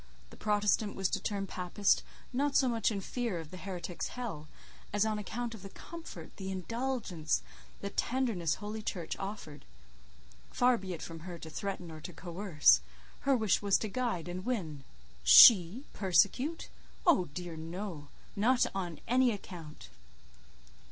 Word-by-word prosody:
The - - -11
Protestant 210 0 +1
was 190 -1 0
to - - -1
turn 200 -2 -2
Papist, 185 +2 +1 0.3
not 280 +2 0
so 265 - +5
much 230 -3 +1
in 205 -3 -3
fear 230 -3 -3
of 160 -2 -9
the 185 - -8
heretic's 180 -2 -5
hell, 200 -12 -6 0.4
as 205 +1 +2
on 215 -1 -1
account 235 +3 -4
of 220 - -10
the 195 - -9
comfort, 320 - -10
the 190 -1 -5
indulgence, 195 -4 -2 0.4
the 200 - -4
tenderness 230 - 0
Holy 215 +1 -6
Church 175 -6 -4
offered: 195 -7 -6 0.9
far 250 0 +3
be 190 -1 -5
it - - -9
from 165 -1 -7
her 175 +1 -8
to 160 -1 -9
threaten 180 0 -4
or 155 -1 -9
to 180 - -8
coerce; 170 - +3 0.5
her 270 - +5
wish 215 -4 +2
was 200 -1 +3
to 220 - -3
guide 225 -8 -2
and 180 +1 -5
win. 165 - -3 0.4
She 185 - +9
persecute? 200 - +2 0.4
Oh 315 - +5
dear 175 -2 -5
no! 165 -1 -6 0.3
not 245 +5 +3
on 175 -5 -4
any 250 +1 +4
account! 175 -7 -9
195 Hz, 155 wpm, -32 LUFS, 175-230 Hz, 0.9 s, She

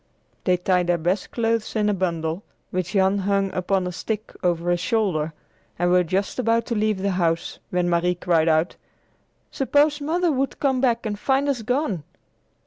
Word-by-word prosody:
They 180 -1 +3
tied 180 0 +1
their 175 0 +2
best 180 +4 -1
clothes 230 -1 -1
in 210 -1 +2
a 210 - +2
bundle, 170 -2 -2 0.3
which 185 +1 -2
Jan 195 0 +3
hung 195 0 0
upon 185 +1 0
a 180 - -3
stick 215 +4 -4
over 175 -1 +1
his 175 - +1
shoulder, 180 -7 0 0.5
and 175 +1 +1
were 180 0 +5
just 190 +7 -2
about 230 -1 +2
to 235 - -2
leave 215 -3 0
the 200 - +1
house, 170 -2 -1
when 180 -1 0
Marie 175 +1 +2
cried 170 -2 +1
out, 160 +2 +1 0.7
"Suppose 290 +2 +2
Mother 330 +1 +1
should 265 0 -2
come 265 -3 +1
back 235 -3 +1
and 205 -1 -3
find 270 +3 +1
us 270 -4 0
gone!" 235 - -1
195 Hz, 180 wpm, -23 LUFS, 175-230 Hz, 0.7 s, were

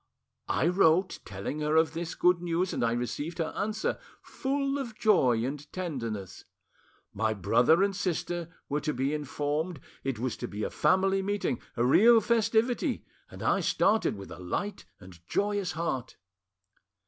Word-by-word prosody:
I - - +2
wrote, 180 0 +3
telling 100 +10 -5
her 150 +1 0
of 160 0 +4
this 165 0 -4
good 180 -1 +3
news, 175 +1 0
and - - -1
I 115 0 +2
received 145 +7 -3
her 165 -2 -2
answer—full 270 +6 -2
of 235 -5 -6
joy 130 - +3
and 145 +2 -6
tenderness. 115 - -5 0.7
My 110 +1 0
brother 125 - +4
and 200 -1 0
sister 175 -2 -2 0.2
were 150 +1 -1
to 150 -1 -2
be 135 +3 0
informed, 150 +2 -2 0.2
it 135 -3 -2
was 125 +1 -2
to - - -4
be 105 +1 -5
a - - -2
family 190 +5 +2
meeting, 200 - -1 0.2
a 120 - +2
real 225 - +7
festivity; 225 +1 +1 0.2
and - - -9
I - - +3
started 215 - +2
with 100 -1 -10
a - - -9
light 190 - -4
and 90 -3 -14
joyous 205 -3 0
heart. 160 -6 -3
165 Hz, 155 wpm, -29 LUFS, 130-195 Hz, 0.7 s, real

